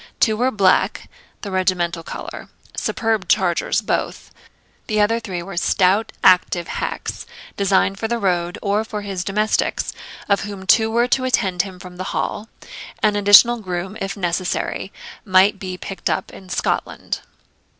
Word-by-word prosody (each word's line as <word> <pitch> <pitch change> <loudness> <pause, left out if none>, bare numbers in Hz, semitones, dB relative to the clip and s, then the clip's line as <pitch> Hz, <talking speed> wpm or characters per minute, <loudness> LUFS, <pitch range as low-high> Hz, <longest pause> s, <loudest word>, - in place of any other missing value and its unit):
Two 220 -3 +3
were 250 +4 +1
black 200 -6 +2 0.3
(the 200 - -6
regimental 180 -3 0
colour), - - -8 0.3
superb 220 -4 -1
chargers 175 -3 +2
both; - - -3 0.6
the 215 -2 0
other 220 +3 +3
three 185 -6 -5
were 195 +1 -8
stout 195 +4 +2
active 180 -2 +4
hacks, - - -4 0.3
designed 195 0 +2
for 225 - -1
the 235 +1 -1
road, 180 -3 0
or 205 +1 +1
for 210 -2 -6
his 195 -3 -4
domestics, 210 +3 0 0.3
of 200 -1 +2
whom 200 -2 -7
two 220 +3 +4
were 235 +2 +2
to 255 +1 +1
attend 190 -8 +1
him 190 -1 -8
from 180 0 -11
the 185 - -4
Hall; 215 +2 -3 0.5
an 210 -1 +3
additional 205 +4 +7
groom, 185 0 -4
if 195 +2 -3
necessary, 180 -1 -2 0.3
might 195 0 +4
be 185 -2 -5
picked 195 0 -4
up - - -2
in 190 - -12
Scotland. - - -2
195 Hz, 150 wpm, -20 LUFS, 185-215 Hz, 0.6 s, additional